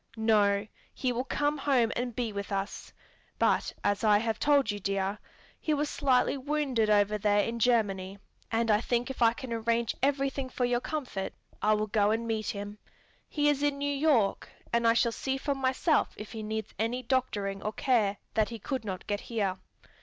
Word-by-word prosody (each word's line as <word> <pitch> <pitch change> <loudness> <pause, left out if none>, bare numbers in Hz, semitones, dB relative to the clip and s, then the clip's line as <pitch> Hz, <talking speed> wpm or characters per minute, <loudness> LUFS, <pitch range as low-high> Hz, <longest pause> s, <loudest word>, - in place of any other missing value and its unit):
"No; 210 -2 +3 0.3
he 255 - -1
will 245 +1 -1
come 290 +1 0
home 255 -5 +2
and 245 -1 -3
be 235 -4 -2
with 200 0 -5
us. 195 0 -4 0.5
But - - +2
as 205 +2 +1
I 210 -1 +6
have 225 0 -1
told 285 -6 +3
you, 205 - -5
dear, 195 +1 -1 0.4
he 310 - 0
was 295 0 -1
slightly 265 -2 +2
wounded 270 -5 0
over 210 0 +3
there 205 0 +3
in 235 0 -3
Germany, 200 -5 +1 0.3
and 225 0 +2
I 210 +1 +3
think 240 +2 -1
if 265 - -9
I 230 -1 +6
can 240 0 -6
arrange 230 0 0
everything 275 -1 0
for 250 -1 -1
your 245 0 +1
comfort, 255 -12 -4 0.3
I 215 +1 +4
will 210 0 0
go 210 -1 +2
and 225 +2 0
meet 220 -1 -2
him. 205 +1 -5 0.5
He 295 -1 +1
is 290 -1 +2
in 290 -1 +1
New 285 0 -1
York, 275 -9 +2 0.2
and 235 0 +3
I 230 - +6
shall 235 0 +3
see 265 +3 -2
for 280 +1 -1
myself 270 +4 +1
if 210 - -8
he 220 - -6
needs 220 0 -4
any 240 +3 -1
doctoring 205 -6 -1
or 215 - -2
care 220 -6 +1 0.2
that 220 -1 +2
he 230 - -6
could 255 +3 -4
not 190 -4 -5
get 205 -1 -1
here. 200 -6 -2
230 Hz, 195 wpm, -29 LUFS, 210-260 Hz, 0.5 s, I